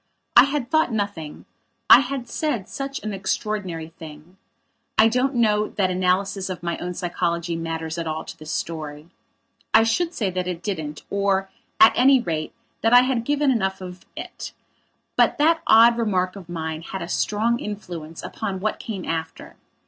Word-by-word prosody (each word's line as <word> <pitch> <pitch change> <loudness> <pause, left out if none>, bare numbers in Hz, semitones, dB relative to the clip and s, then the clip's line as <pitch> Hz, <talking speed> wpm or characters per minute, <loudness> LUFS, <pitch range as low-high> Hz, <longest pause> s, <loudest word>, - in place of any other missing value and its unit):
I 240 - +9
had 275 -3 -3
thought 315 -5 +3
nothing; 200 -8 -4 0.4
I - - +10
had 265 -2 -3
said 240 - -2
such 275 -1 -5
an 215 -1 -3
extraordinary 190 -4 -3
thing. 160 +3 -12 0.6
I 220 - +7
don't 250 +4 +1
know 215 -3 +2
that 190 -2 0
analysis 185 +1 0
of 180 -2 -6
my 170 0 -1
own 180 0 -4
psychology 170 -1 -2
matters 165 0 -4
at 165 - -3
all 160 0 -3
to - - -8
this 155 0 -8
story. 155 -1 -5 0.6
I 225 - +8
should 330 +10 +1
say 200 -5 -1
that 180 0 -3
it 175 -1 -4
didn't 155 -7 -4
or, 195 -1 0 0.3
at 220 - +8
any 265 +2 +6
rate, 160 -9 -3 0.3
that 225 +1 +3
I 245 - +9
had 250 -2 0
given 290 0 +2
enough 190 -5 0
of 180 -1 -9
it. - - -7 0.6
But - - +4
that 325 +3 +3
odd 230 +1 +7
remark 185 -5 0
of 185 -4 -11
mine 160 -2 -4
had 190 +2 -6
a - - -6
strong 225 +6 0
influence 175 -6 -7
upon 195 -3 -4
what 215 +3 -2
came 200 -5 -6
after. 160 0 -5
195 Hz, 170 wpm, -23 LUFS, 170-230 Hz, 0.6 s, I